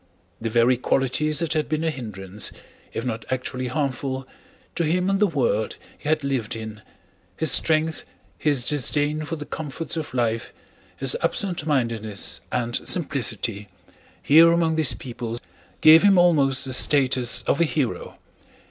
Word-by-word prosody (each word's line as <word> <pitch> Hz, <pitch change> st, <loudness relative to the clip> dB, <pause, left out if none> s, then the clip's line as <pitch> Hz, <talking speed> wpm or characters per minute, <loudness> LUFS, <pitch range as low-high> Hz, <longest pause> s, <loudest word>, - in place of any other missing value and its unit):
The 115 Hz, -, -2 dB
very 120 Hz, +2 st, +3 dB
qualities 135 Hz, +4 st, 0 dB
that 165 Hz, -2 st, 0 dB
had 155 Hz, -1 st, -1 dB
been 155 Hz, 0 st, -1 dB
a 160 Hz, -, +1 dB
hindrance, 105 Hz, -7 st, -5 dB, 0.4 s
if 115 Hz, -, -4 dB
not 115 Hz, -2 st, -3 dB
actually 130 Hz, 0 st, -3 dB
harmful, 135 Hz, -1 st, -3 dB, 0.5 s
to 170 Hz, -, 0 dB
him 180 Hz, +4 st, +1 dB
in 195 Hz, -, +1 dB
the 210 Hz, -, +4 dB
world 125 Hz, -, 0 dB, 0.2 s
he 150 Hz, -, -6 dB
had 155 Hz, -1 st, +1 dB
lived 130 Hz, -6 st, -2 dB
in—his 110 Hz, -, -6 dB
strength, 160 Hz, 0 st, +2 dB, 0.4 s
his 145 Hz, -5 st, +1 dB
disdain 150 Hz, +2 st, 0 dB
for 165 Hz, -, -4 dB
the 150 Hz, -2 st, -7 dB
comforts 155 Hz, +2 st, -4 dB
of 155 Hz, -5 st, -5 dB
life, 115 Hz, -2 st, -1 dB, 0.5 s
his 135 Hz, 0 st, +2 dB
absent 175 Hz, -1 st, -2 dB
mindedness 115 Hz, -7 st, -1 dB
and 120 Hz, -1 st, -1 dB
simplicity—here 115 Hz, -, 0 dB
among 165 Hz, -1 st, +2 dB
these 155 Hz, -5 st, +1 dB
people 120 Hz, -2 st, -6 dB, 0.4 s
gave 155 Hz, +1 st, +8 dB
him 200 Hz, -2 st, +5 dB
almost 145 Hz, -8 st, +3 dB
the 130 Hz, -, -3 dB
status 130 Hz, -2 st, +3 dB
of 145 Hz, -, 0 dB
a -, -, +7 dB
hero. 150 Hz, -6 st, -2 dB
135 Hz, 145 wpm, -23 LUFS, 120-155 Hz, 0.5 s, gave